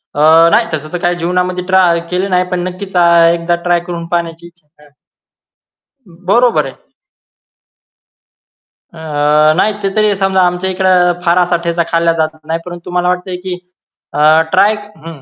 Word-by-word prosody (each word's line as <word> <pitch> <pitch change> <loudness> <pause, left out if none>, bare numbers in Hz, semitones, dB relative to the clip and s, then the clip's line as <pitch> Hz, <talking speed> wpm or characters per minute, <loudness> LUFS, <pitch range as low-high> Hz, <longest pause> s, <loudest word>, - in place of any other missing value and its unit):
अ, 160 +3 +5
नाही - - +3
तसं 155 0 -4
तर - - -1
काही 175 0 0
जीवनामध्ये 180 +1 -2
ट्राय 180 -3 +3
केले 185 +2 -1
नाही, 180 -1 +2
पण 180 - -1
नक्कीच 190 +1 -8
आ, 170 -1 +4
एकदा 170 0 0
ट्राय 175 0 +2
करून 170 -1 -5
पाहण्याची 170 -1 -3
इच्छा 170 -3 -24 0.2
आहे. 145 - -20 1.4
बरोबर 240 +4 +2
आहे. - - -9 2.2
अ, - - -14 0.6
नाही 215 - +1
ते 195 - 0
तरी 215 -1 +2
समजा 195 -1 +1
आमच्या 180 +1 -3
इकडे 190 0 0 0.4
फारसाठ्याचा 170 -1 +1
खाल्ला 165 0 +1
जातच 155 0 -2
नाही 165 +1 -2
परंतु 175 -1 -9
तुम्हाला 180 0 -2
वाटतंय 180 0 -3
की 180 0 -6 0.6
अ, 155 +2 +4
ट्राय 195 +3 +4 0.3
हं. 160 -5 -10
175 Hz, 150 wpm, -13 LUFS, 170-185 Hz, 2.2 s, अ